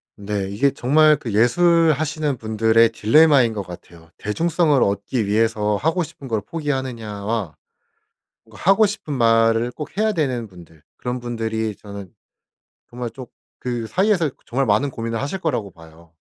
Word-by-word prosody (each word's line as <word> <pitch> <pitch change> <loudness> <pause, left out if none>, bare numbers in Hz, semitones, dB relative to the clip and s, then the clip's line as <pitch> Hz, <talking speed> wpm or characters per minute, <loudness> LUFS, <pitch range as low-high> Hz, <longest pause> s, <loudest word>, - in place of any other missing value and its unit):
네 100 -1 -4
이게 125 +8 +1
정말 150 +5 +4
그 115 -5 -6
예술하시는 155 - +2
분들의 110 +1 +3
딜레마인 125 +2 +4
것 105 - -3
같아요. 85 -2 -12
'대중성을 155 +5 +1
얻기 100 +3 0
위해서 105 0 +1
하고 160 - 0
싶은 150 -3 -10
걸 110 -4 -1
포기하느냐.'와 115 - -4 0.9
뭔가 110 -1 -15
하고 215 +2 +5
싶은 200 -7 -4
말을 115 -1 +3
꼭 150 +7 -9
해야 215 +1 +2
되는 130 - -2
분들 85 -5 -16 0.2
그런 125 0 -4
분들이 110 -3 -3
저는 100 -2 -10 0.8
정말 120 -1 -5
쪽 130 0 -11 0.3
그 120 -2 -3
사이에서 185 - +1
그 - - -30
정말 135 +3 0
많은 110 +5 +2
고민을 115 -2 -4
하실 145 +8 -3
거라고 135 - -2
봐요. 80 0 -18
115 Hz, 320 characters per minute, -21 LUFS, 105-150 Hz, 0.9 s, 하고